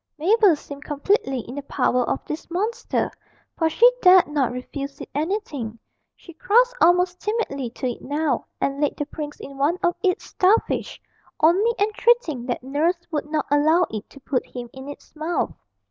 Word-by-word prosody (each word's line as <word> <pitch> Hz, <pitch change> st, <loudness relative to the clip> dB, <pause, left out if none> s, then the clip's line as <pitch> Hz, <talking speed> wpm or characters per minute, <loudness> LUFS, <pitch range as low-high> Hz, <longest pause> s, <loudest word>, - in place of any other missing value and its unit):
Mabel 390 Hz, +2 st, +4 dB
seemed 285 Hz, 0 st, -10 dB
completely 285 Hz, -, 0 dB
in 240 Hz, -, -10 dB
the 285 Hz, -, -4 dB
power 250 Hz, -2 st, +1 dB
of -, -, -2 dB
this 305 Hz, +2 st, -6 dB
monster, 410 Hz, +7 st, -1 dB, 0.4 s
for 325 Hz, -1 st, +1 dB
she 465 Hz, +9 st, +6 dB
dared 365 Hz, -1 st, +7 dB
not 290 Hz, -5 st, 0 dB
refuse 275 Hz, +3 st, -6 dB
it -, -, -7 dB
anything; 295 Hz, -, -3 dB, 0.4 s
she 340 Hz, -, -14 dB
crossed 480 Hz, +9 st, +3 dB
almost 360 Hz, +1 st, +3 dB
timidly 395 Hz, -, -2 dB
to 240 Hz, -, -7 dB
it 245 Hz, -, -4 dB
now, 300 Hz, +3 st, -1 dB
and 275 Hz, +1 st, -1 dB
laid 295 Hz, -, 0 dB
the 295 Hz, -, -2 dB
prince 295 Hz, 0 st, -7 dB
in 275 Hz, 0 st, -10 dB
one 305 Hz, +6 st, +2 dB
of 350 Hz, 0 st, +2 dB
its 365 Hz, -1 st, +1 dB
starfish, 390 Hz, +5 st, +1 dB, 0.4 s
only 390 Hz, +9 st, +4 dB
entreating 415 Hz, -, +1 dB
that 245 Hz, -, -3 dB
nurse 300 Hz, +7 st, +1 dB
would 300 Hz, -1 st, -2 dB
not 305 Hz, -1 st, -1 dB
allow 310 Hz, +5 st, +4 dB
it 215 Hz, -2 st, -6 dB
to 275 Hz, -, -14 dB
put 260 Hz, -1 st, -1 dB
him 240 Hz, -2 st, -9 dB
in 265 Hz, +1 st, -9 dB
its 290 Hz, -, -12 dB
mouth. 315 Hz, +3 st, -1 dB
305 Hz, 175 wpm, -23 LUFS, 275-365 Hz, 0.4 s, dared